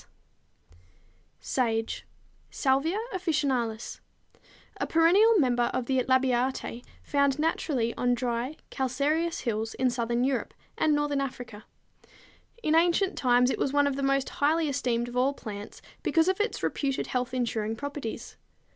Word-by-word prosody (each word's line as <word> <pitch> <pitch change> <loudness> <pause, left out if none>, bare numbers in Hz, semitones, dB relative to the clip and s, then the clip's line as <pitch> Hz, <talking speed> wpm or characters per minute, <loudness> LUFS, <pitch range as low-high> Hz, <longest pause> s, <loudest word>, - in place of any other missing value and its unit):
=Sage= 225 -3 -1 0.4
(Salvia 280 +7 +1 0.2
officinalis, 270 -11 -1 0.3
Linn.), - - -31 0.4
a - - -2
perennial 385 +8 +5
member 245 -6 +2
of 255 - -1
the 260 0 +1
Labiatæ, 255 -1 +1 0.2
found 280 -1 +1
naturally 295 -6 0
on 245 0 +1
dry, 245 +3 -2 0.2
calcareous 290 +6 0
hills 225 -2 -2
in 255 -1 +1
southern 240 0 0
Europe, 260 -2 -1 0.2
and 305 -1 +2
northern 290 -1 0
Africa. 245 -5 -6 1.0
In 310 - +2
ancient 345 +4 +3
times, 250 0 +3
it - - -3
was 270 - 0
one 290 0 +4
of 280 -1 0
the 275 - -3
most 275 0 +1
highly 315 +2 +1
esteemed 250 -4 -1
of 245 - -8
all 265 +3 +2
plants 205 -4 -8 0.2
because 325 0 +2
of 380 +2 +1
its 440 - -2
reputed 275 -2 -1
health 250 0 -2
insuring 225 -3 -1
properties. 285 -2 -6
265 Hz, 140 wpm, -28 LUFS, 245-295 Hz, 1.0 s, perennial